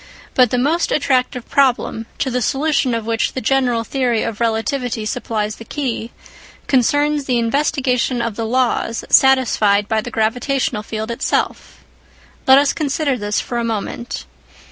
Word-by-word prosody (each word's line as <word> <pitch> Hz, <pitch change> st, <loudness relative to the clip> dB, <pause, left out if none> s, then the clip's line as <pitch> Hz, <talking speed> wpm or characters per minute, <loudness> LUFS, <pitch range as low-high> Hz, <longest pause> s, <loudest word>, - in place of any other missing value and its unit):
But 250 Hz, -2 st, +4 dB
the 250 Hz, -, 0 dB
most 305 Hz, +7 st, +1 dB
attractive 255 Hz, -3 st, 0 dB
problem, 245 Hz, -4 st, +1 dB
to 265 Hz, -, -1 dB
the 250 Hz, +1 st, -1 dB
solution 275 Hz, -1 st, +1 dB
of 225 Hz, -1 st, -3 dB
which 225 Hz, -1 st, 0 dB
the -, -, -2 dB
general 250 Hz, -2 st, +1 dB
theory 245 Hz, -1 st, 0 dB
of 225 Hz, -2 st, -4 dB
relativity 230 Hz, 0 st, -1 dB
supplies 215 Hz, -2 st, -3 dB
the -, -, -9 dB
key, 235 Hz, -3 st, -3 dB, 0.6 s
concerns 290 Hz, +3 st, +2 dB
the 250 Hz, -2 st, +1 dB
investigation 255 Hz, 0 st, 0 dB
of 230 Hz, -3 st, -2 dB
the 225 Hz, 0 st, -3 dB
laws 240 Hz, -1 st, 0 dB
satisfied 220 Hz, -6 st, +4 dB
by 220 Hz, 0 st, 0 dB
the 245 Hz, -, -6 dB
gravitational 240 Hz, +1 st, -1 dB
field 220 Hz, +1 st, -5 dB
itself. 235 Hz, +3 st, -2 dB, 0.6 s
Let 265 Hz, 0 st, +8 dB
us 285 Hz, 0 st, +3 dB
consider 290 Hz, -2 st, -1 dB
this 210 Hz, -3 st, -1 dB
for 240 Hz, -, -3 dB
a -, -, -1 dB
moment. 230 Hz, +1 st, -4 dB
245 Hz, 150 wpm, -18 LUFS, 225-270 Hz, 0.6 s, Let